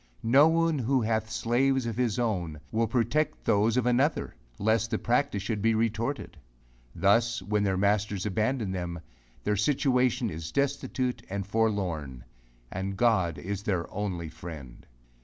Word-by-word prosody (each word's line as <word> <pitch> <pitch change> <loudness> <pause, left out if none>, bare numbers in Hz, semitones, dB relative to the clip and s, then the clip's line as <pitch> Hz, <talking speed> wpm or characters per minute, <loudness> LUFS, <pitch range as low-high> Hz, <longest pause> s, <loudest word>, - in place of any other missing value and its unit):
No 135 +7 +6
one 165 -2 +2
who 130 +2 +1
hath 110 0 0
slaves 130 +3 +1
of 115 -2 -3
his 120 -2 0
own, 90 -10 -1
will 115 +1 +1
protect 125 +7 0
those 110 +3 +3
of 125 - +2
another, 130 +5 +1 0.2
less 110 +2 +2
the 115 -1 -1
practice 120 -4 0
should 105 -1 -2
be 115 +1 +3
retorted. 115 - -2 0.6
Thus 115 +2 +2
when 105 +2 0
their 95 -2 +1
masters 100 0 +1
abandon 110 +1 0
them, 90 -2 -4 0.4
their 105 - +1
situation 125 0 +1
is 80 0 -6
destitute 135 -3 -1
and 100 0 -3
forlorn, 95 - -1 0.5
and 95 +1 -4
God 95 -9 +2
is 100 +2 -4
their 95 -5 -1
only 95 -5 -3
friend! 80 -6 -10
110 Hz, 145 wpm, -28 LUFS, 95-125 Hz, 0.6 s, No